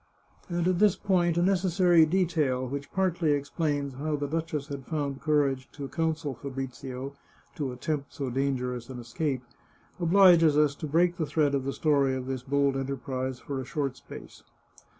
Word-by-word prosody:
And 175 0 0
at 180 -1 +2
this 210 -2 +5
point 175 -3 +1
a 175 - +3
necessary 180 -3 +4
detail, 155 -7 +1
which 140 +2 -5
partly 175 -5 +1
ex 140 0 -5
plains 145 -4 -1
how 150 +4 -2
the 145 0 -2
duchess 155 -1 -3
had 140 -3 -7
found 145 -3 -3
courage 140 -4 +1
to 140 -2 -6
counsel 160 -2 -2
Fa 140 +3 -7
brizio 130 0 -6 0.4
to 140 -4 -3
attempt 140 +3 -3
so 135 -4 -4
dangerous 125 -2 -2
an 130 - -7
escape, 125 +2 -3 0.6
obliges 170 -3 +6
us 150 -2 +4
to 155 +2 -6
break 175 +4 +2
the 160 -4 -1
thread 145 -2 +1
of 135 -2 0
the 135 - -1
story 140 -4 +2
of 130 -1 -4
this 130 -1 -3
bold 140 +1 +1
enterprise 130 -1 -3
for 135 -1 -4
a - - -5
short 140 -1 -2
space. - - -12
145 Hz, 175 wpm, -28 LUFS, 135-165 Hz, 0.6 s, obliges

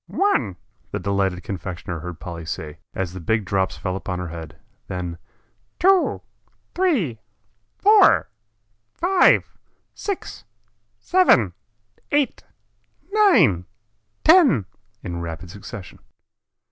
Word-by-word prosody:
"One," 255 - +1 0.3
the - - -3
delighted 95 -2 -1
confectioner 90 -3 -5
heard 90 0 -7
Polly 85 -2 -7
say, 75 0 -6 0.2
as 90 -2 -3
the 95 - -7
big 110 +5 0
drops 95 0 0
fell 95 -2 -3
upon 90 -1 -4
her 90 -1 -4
head, 80 -1 -9 0.3
then 90 -2 -5 0.6
"two, 380 0 +3 0.5
three, 250 - +1 0.6
four, 410 - +5 0.7
five, 365 +1 +3 0.3
six, 400 -3 -5 0.5
seven, 130 - +3 0.6
eight, 290 -2 +1 0.7
nine, 205 - +4 0.6
ten," 310 - +6 0.4
in 85 -2 -4
rapid 85 +1 -7
succession. 105 -1 -10
95 Hz, 100 wpm, -22 LUFS, -, 0.7 s, ten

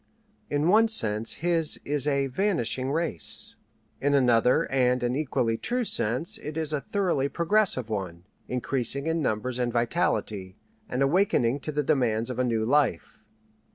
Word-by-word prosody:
In 145 +2 0
one 220 +5 +5
sense 110 - +1
his 165 -3 +4
is 145 0 0
a 140 -1 +1
"vanishing 135 - -1
race." 160 - -2 0.5
In 145 +1 +2
another 125 -2 +3
and 125 -1 +1
an 120 +1 0
equally 125 -6 -1
true 250 +1 -2
sense 125 - +1
it 150 +1 -7
is 155 -1 -1
a 145 - -1
thoroughly 175 -9 -1
progressive 170 - +1
one, 90 -5 -5 0.2
increasing 130 +2 0
in 160 0 -1
numbers 125 0 -2
and 120 -1 -1
vitality, 105 -4 -2 0.3
and 130 +2 0
awakening 140 - +1
to 155 - -5
the 150 0 -1
demands 120 -4 0
of 125 - -6
a - - +2
new 115 -3 0
life. 130 - 0
135 Hz, 155 wpm, -26 LUFS, 120-155 Hz, 0.5 s, one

